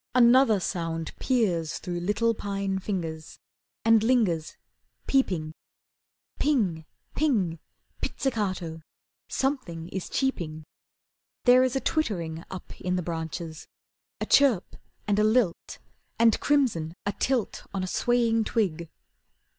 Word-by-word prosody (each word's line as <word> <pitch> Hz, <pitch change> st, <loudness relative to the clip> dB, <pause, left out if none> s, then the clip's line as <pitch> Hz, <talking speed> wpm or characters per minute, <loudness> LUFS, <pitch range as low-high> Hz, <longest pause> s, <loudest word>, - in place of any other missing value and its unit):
Another 240 Hz, -3 st, +6 dB
sound 165 Hz, -3 st, -3 dB
peers 185 Hz, -, +1 dB
Through 175 Hz, -1 st, -4 dB
little 210 Hz, +6 st, +1 dB
pine 195 Hz, -2 st, -2 dB
fingers, 165 Hz, -5 st, -4 dB, 0.5 s
And 225 Hz, -1 st, +6 dB
lingers, 215 Hz, -10 st, +1 dB, 0.5 s
peeping. 180 Hz, -, +1 dB, 0.9 s
Ping! 200 Hz, -, +1 dB, 0.3 s
Ping! 200 Hz, -, +1 dB, 0.4 s
pizzicato, 185 Hz, -10 st, -2 dB, 0.5 s
something 250 Hz, -, -2 dB
is 190 Hz, -1 st, -5 dB
cheeping. 170 Hz, -, -2 dB, 0.8 s
There 250 Hz, 0 st, +7 dB
is 255 Hz, -1 st, 0 dB
a -, -, +2 dB
twittering 170 Hz, -, -1 dB
up 185 Hz, -, -9 dB
in 180 Hz, 0 st, 0 dB
the 180 Hz, -, -1 dB
branches, 160 Hz, -1 st, -5 dB, 0.5 s
A -, -, -2 dB
chirp 260 Hz, -10 st, +3 dB, 0.3 s
and 205 Hz, 0 st, +2 dB
a -, -, +4 dB
lilt, 215 Hz, -5 st, +1 dB, 0.4 s
And 230 Hz, -1 st, +4 dB
crimson 225 Hz, -, +1 dB
atilt 230 Hz, +3 st, -1 dB
on 195 Hz, -1 st, -2 dB
a -, -, -2 dB
swaying 230 Hz, +2 st, +2 dB
twig. 170 Hz, -9 st, -1 dB
195 Hz, 110 wpm, -27 LUFS, 165-240 Hz, 0.9 s, There